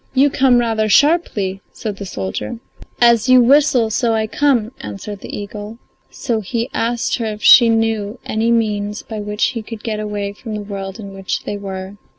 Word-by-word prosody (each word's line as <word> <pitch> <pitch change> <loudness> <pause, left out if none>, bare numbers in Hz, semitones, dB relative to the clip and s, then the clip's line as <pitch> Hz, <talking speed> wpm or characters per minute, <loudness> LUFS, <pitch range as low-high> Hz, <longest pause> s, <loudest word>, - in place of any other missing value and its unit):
"You 275 +2 +4
come 260 -2 +4
rather 225 -2 +1
sharply," 205 - +2
said 210 -3 -5
the 200 - -7
soldier. 100 - -4 0.4
"As 235 0 +4
you 255 0 +8
whistle 255 -2 +4
so 230 +1 +1
I 220 0 0
come," 240 -2 +1
answered 105 - -7
the - - -10
eagle. 205 +2 -7 0.3
So 235 -5 -2
he 235 +5 -3
asked 235 +1 -1
her 235 - -3
if 210 -1 -6
she 240 -3 +8
knew 225 -1 0
any 220 +2 0
means 210 -2 0
by 220 -2 -6
which 210 +1 -1
he 235 -3 -5
could 220 0 -9
get 215 -2 -3
away 205 -1 -3
from 215 +1 -7
the 210 - -5
world 195 0 -6
in 200 -2 -8
which 195 -1 -4
they - - -4
were. 195 0 -7
220 Hz, 185 wpm, -18 LUFS, 205-235 Hz, 0.4 s, you